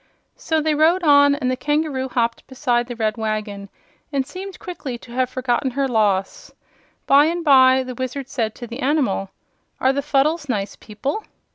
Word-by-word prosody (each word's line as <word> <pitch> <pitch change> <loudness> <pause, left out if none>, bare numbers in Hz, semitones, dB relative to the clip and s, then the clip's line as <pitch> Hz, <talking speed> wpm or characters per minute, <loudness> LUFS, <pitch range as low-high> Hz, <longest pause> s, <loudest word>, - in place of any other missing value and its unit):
So 320 -1 -1
they 310 0 +1
rode 325 +5 +3
on, 285 -2 +6
and 255 -3 -1
the - - 0
kangaroo 295 -2 -1
hopped 235 -2 -1
beside 245 -3 0
the 245 - -6
red 220 -1 -1
wagon 215 -2 -4 0.4
and 275 -2 0
seemed 370 +6 -8
quickly 290 -9 -6
to 235 - -15
have 255 +1 0
forgotten 255 0 -1
her 270 +2 -1
loss. 205 -5 0 0.5
By 280 +2 +6
and 340 +1 -2
by 260 -2 +6
the 255 0 -6
Wizard 260 +2 -5
said 225 -5 -2
to 240 - -8
the 240 +2 -8
animal: 260 -9 0 0.5
"Are 260 +1 +3
the 280 - -1
Fuddles 290 +2 0
nice 205 -4 -2
people?" 270 - -5
260 Hz, 175 wpm, -21 LUFS, 235-290 Hz, 0.5 s, on